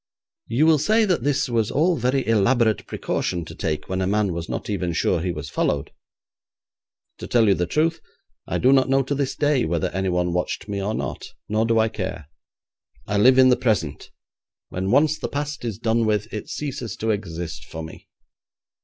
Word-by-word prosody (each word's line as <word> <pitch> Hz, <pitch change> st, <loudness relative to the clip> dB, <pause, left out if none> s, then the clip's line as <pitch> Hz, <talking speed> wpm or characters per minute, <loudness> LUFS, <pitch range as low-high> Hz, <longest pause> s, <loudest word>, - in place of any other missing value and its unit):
You 125 Hz, +7 st, +2 dB
will 160 Hz, -2 st, +5 dB
say 220 Hz, +8 st, +3 dB
that 180 Hz, -, +1 dB
this 145 Hz, +2 st, +1 dB
was 115 Hz, -4 st, 0 dB
all 170 Hz, +5 st, +2 dB
very 130 Hz, +1 st, 0 dB
elaborate 115 Hz, 0 st, +2 dB
precaution 85 Hz, -2 st, -2 dB
to -, -, -9 dB
take 75 Hz, -1 st, -3 dB
when 95 Hz, 0 st, -2 dB
a 95 Hz, -, 0 dB
man 100 Hz, -2 st, +1 dB
was 85 Hz, 0 st, -5 dB
not -, -, -4 dB
even 90 Hz, -5 st, -2 dB
sure 85 Hz, +1 st, +1 dB
he 90 Hz, +1 st, -1 dB
was 75 Hz, -2 st, -6 dB
followed. 70 Hz, -1 st, -1 dB, 1.3 s
To -, -, -6 dB
tell 115 Hz, -3 st, +3 dB
you 100 Hz, -, +5 dB
the 90 Hz, -2 st, -1 dB
truth, 160 Hz, -, 0 dB, 0.5 s
I -, -, -1 dB
do 130 Hz, +2 st, +4 dB
not 130 Hz, -1 st, +3 dB
know 135 Hz, 0 st, +3 dB
to 135 Hz, -, -2 dB
this 140 Hz, -2 st, -1 dB
day 145 Hz, -3 st, +2 dB
whether 80 Hz, 0 st, 0 dB
anyone 90 Hz, -2 st, 0 dB
watched 90 Hz, +3 st, -2 dB
me 100 Hz, -1 st, -3 dB
or 105 Hz, +3 st, -2 dB
not, -, -, -4 dB, 0.2 s
nor 110 Hz, +2 st, +1 dB
do 115 Hz, -1 st, +2 dB
I 110 Hz, 0 st, +4 dB
care. 90 Hz, -7 st, -5 dB, 0.7 s
I 100 Hz, 0 st, 0 dB
live 130 Hz, +4 st, +6 dB
in 130 Hz, -1 st, +7 dB
the 125 Hz, -, +5 dB
present: 105 Hz, -, -1 dB, 0.6 s
when 95 Hz, +1 st, -3 dB
once 150 Hz, +5 st, +3 dB
the -, -, -3 dB
past 145 Hz, 0 st, -4 dB
is 115 Hz, -5 st, -3 dB
done 115 Hz, 0 st, +1 dB
with, 105 Hz, +1 st, -1 dB
it 105 Hz, -, -5 dB
ceases 130 Hz, -7 st, -4 dB
to 110 Hz, 0 st, 0 dB
exist 85 Hz, -6 st, -5 dB
for 80 Hz, -, -7 dB
me. 80 Hz, -, -11 dB
110 Hz, 200 wpm, -23 LUFS, 90-135 Hz, 1.3 s, in